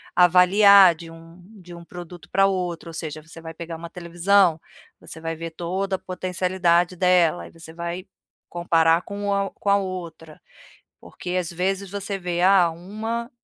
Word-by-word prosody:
avaliar 185 +1 +7
de 165 0 -11
um 165 +2 -15 0.2
de 175 0 -12
um 170 - -11
produto 175 0 -11
para 195 - +4
outro. 180 -3 -3
Ou 165 - -10
seja, 155 -1 -6
você 165 +1 -13
vai 160 0 -8
pegar 170 0 -7
uma 170 +1 -9
televisão, 175 0 +2 0.4
você - - -7
vai 165 0 -4
ver 165 +1 -6
toda 190 +4 -3
a 190 - -7
potencialidade 180 -1 0
dela, 180 -2 +2
aí - - -12
você 165 -1 -12
vai 170 +2 -5 0.4
comparar 165 -1 +2
com 200 0 -3
a 200 0 0
o - - -10
com 200 - -4
a 200 - +5
outra, 175 -5 -7 0.6
porque 180 - -9
às 175 -1 -3
vezes 190 +3 -2
você 200 0 -4
vê: 175 -1 -3
"Ah, 185 -2 +5
uma 220 +8 -5
180 Hz, 175 wpm, -23 LUFS, 165-190 Hz, 0.6 s, avaliar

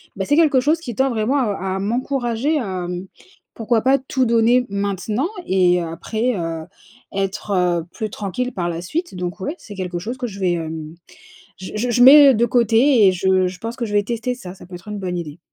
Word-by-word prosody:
bah 195 - -2
c'est 290 +7 +2
quelque 295 -6 +4
chose 310 +4 +2
qui 245 -9 -7
tend 265 +3 +2
vraiment 235 +3 0
à 195 -6 -1
à - - -2
m'encourager. 245 +5 -1
Hem, 185 -7 -3 0.5
pourquoi 225 0 0
pas 265 +3 +4
tout 260 0 -1
donner 235 +2 +3
maintenant? 200 - -2 0.2
Et 180 -2 +3
après, 215 +9 -2
heu, 165 -1 -3 0.5
être, 195 +2 -3
heu, 180 -3 +1
plus 215 +2 -4
tranquille 210 +6 -4
par 175 -2 -2
la 170 0 -4
suite. 335 - -4
Donc 180 0 -5
ouais, 290 - -3
c'est 205 - -11
quelque 180 -2 -4
chose 235 +7 -5
que 250 -1 -3
je 200 -3 -9
vais 185 -2 +1
hem, 160 -1 -5 0.6
je 185 - -9
je 235 +4 -1
je 245 - +2
mets, 285 +2 +10
heu, - - +2
de 235 0 +2
côté 235 0 +4
et 185 - +5
je 185 0 +2
je 180 0 -7
pense 230 +1 -5
que 250 - -5
je 210 - -6
vais 205 0 +3
tester 235 +3 -3
ça, 180 -7 -9
ça - - -14
peut 180 0 -10
être 175 +4 -13
une 210 -1 -5
bonne 180 -2 -3
idée. 160 -1 -7
210 Hz, 220 wpm, -20 LUFS, 180-245 Hz, 0.6 s, mets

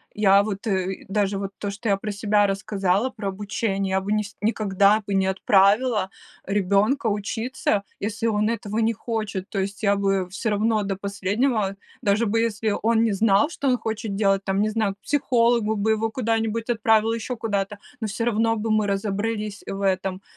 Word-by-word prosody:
я 200 -1 +5
вот, 205 +1 -5
э, 190 -3 -2
даже 200 0 0
вот 195 0 -4
то, 205 - -3
что 200 +3 -6
я 200 - +4
про 210 +2 -4
себя 205 0 +2
рассказала 195 +2 0
про 215 -5 -6
обучение, 195 0 -2
я 190 0 +1
нис 210 -1 -2
бы 210 - +2
никогда 205 -1 +3
бы 200 - -3
не 190 -1 +2
отправила 200 +2 +3 0.4
ребенка 200 +6 +1
учиться, 210 0 -1 0.2
если 215 +2 -3
он 215 -1 +1
этого 215 -1 -2
не 225 0 +2
хочет. 215 -4 -4
То 200 - -3
есть 195 +2 -4
я 200 -1 +4
бы 195 -2 0
всё 220 +4 -2
равно 215 +1 +1
до 195 -1 -2
последнего, 200 +2 -1 0.3
даже 215 0 +2
бы 225 +1 +1
если 220 -2 0
он 225 +1 +3
не 225 - +2
знал, 205 +6 +3
что 280 - -3
он 250 -1 +3
хочет 220 -2 -4
делать, 195 -1 +2
там 195 +1 0
не 215 - +2
знаю, 215 -2 -1
к - - -50
психологу 235 -5 +2
бы 215 +1 +1
его 220 +1 +1
куда-нибудь 225 -1 -1
отправила, 225 0 +3
еще 230 +2 -3
куда-то, 205 -2 -2 0.2
но 220 - -1
всё 220 +3 -3
равно 225 0 +2
бы 220 0 -2
мы 215 -1 +2
разобрались 205 +1 -2
в 195 - -4
этом. 190 0 -1
210 Hz, 190 wpm, -24 LUFS, 195-225 Hz, 0.4 s, я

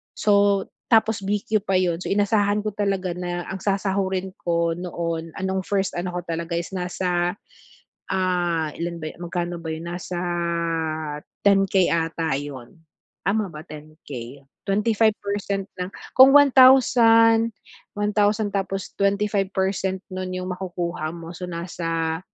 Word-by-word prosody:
so 200 -1 +3 0.3
tapos 220 -1 +4
BQ 210 +2 0
pa 195 - +2
yun. 175 -2 0
So, - - -6
inasahan 205 0 +2
ko 215 - -2
talaga 195 -3 -1
na 175 -1 -3
ang 195 - -5
sasahurin 190 -1 -1
ko 170 -1 0
noon, 165 -2 -4
ah, 190 - -5
'nong 190 0 0
1st 195 -2 0
ano 180 +1 -3
ko - - 0
talaga 170 0 -3
is, 170 +3 -4
nasa 180 0 -1 0.8
ah, 175 -4 0
ilan 170 0 -4
ba 155 - -4
yu - - -19
magkano 175 0 -3
ba 160 - -4
yun? 160 +1 -6
Nasa 175 0 -5 1.3
10K 195 -2 +4
ata 165 -2 0
yun, 140 -4 -8 0.5
tama 205 +2 +1
ba 155 0 -9
10K? 145 -5 -9 0.3
25% 205 -1 0
ng 180 - -2 0.3
kung 265 +1 +9
1,000, 240 -5 +6 0.4
1,000 205 0 +1
tapos 195 -1 -2
25% 195 -2 0
nun 185 0 -4
yung 185 0 -4
makukuha 175 -3 -4
mo. 170 0 -8
So, 180 +2 -6
nasa 165 -2 -3
185 Hz, 130 wpm, -23 LUFS, 170-205 Hz, 1.3 s, kung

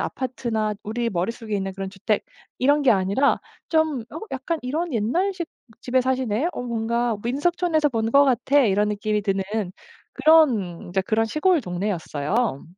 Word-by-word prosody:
아파트나 230 -4 -2
우리 235 +3 -2
머릿속에 215 +3 -3
있는 195 0 -3
그런 195 0 -5
주택 200 +2 -1 0.3
이런 290 +3 +3
게 270 - +5
아니라 200 +7 +2 0.3
좀 315 -5 +2
'어 320 - -7
약간 270 +5 -2
이런 310 +6 -2
옛날식 340 - 0 0.3
집에 255 +1 +1
사시네. 260 -3 0 0.2
어 245 - -5
뭔가 235 0 -1
민속촌에서 310 +4 +1
본 225 -4 -1
것 280 +3 +6
같아.' 270 +2 +2
이런 210 -4 +2
느낌이 210 0 -1
드는 195 -1 0 0.7
그런 250 - +3
인제 185 +2 0
그런 220 +3 +1
시골 305 +9 +2
동네였어요. 180 - -2
235 Hz, 320 characters per minute, -23 LUFS, 205-280 Hz, 0.7 s, 것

